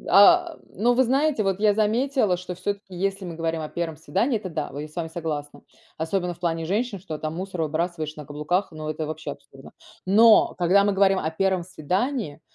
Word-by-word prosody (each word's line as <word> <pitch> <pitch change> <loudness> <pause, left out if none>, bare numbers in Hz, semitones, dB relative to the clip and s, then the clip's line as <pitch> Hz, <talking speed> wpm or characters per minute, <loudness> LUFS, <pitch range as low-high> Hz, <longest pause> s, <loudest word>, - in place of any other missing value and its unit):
А, 200 0 +6 0.2
но, 235 +6 +2
вы 260 +2 +4
знаете, 270 -1 +1
вот 195 0 0
я 210 -1 +4
заметила, 220 -1 +2
что 180 0 -6
всё-таки, 200 +1 -4
если 195 +1 -2
мы 170 -2 -6
говорим 165 -1 -2
о 155 - -4
1 165 -2 -4
свидании- 200 - 0
это, 195 -3 -6
да. 155 -3 -4
Вы 145 - -5
я - - -9
с 155 - -21
вами 170 -2 -2
согласна. 155 -3 -5 0.4
Особенно 175 +2 -1
в 170 - -25
плане 165 -2 -1
женщин: 205 +4 -1
что 160 -4 -7
там 155 +1 -4
мусор 185 -2 -4
выбрасываешь 155 0 -2
на 150 - -8
каблуках- 150 +7 -1
но 155 -1 -5
это 155 0 -3
вообще 155 0 -5
абсурдно. - - -15 0.4
Но, 220 +3 +6
когда 185 +3 +4
мы 205 - +2
говорим 195 -1 +4
о 155 - -2
1 190 +1 0
свидании, 185 - -2
180 Hz, 205 wpm, -24 LUFS, 160-200 Hz, 0.4 s, А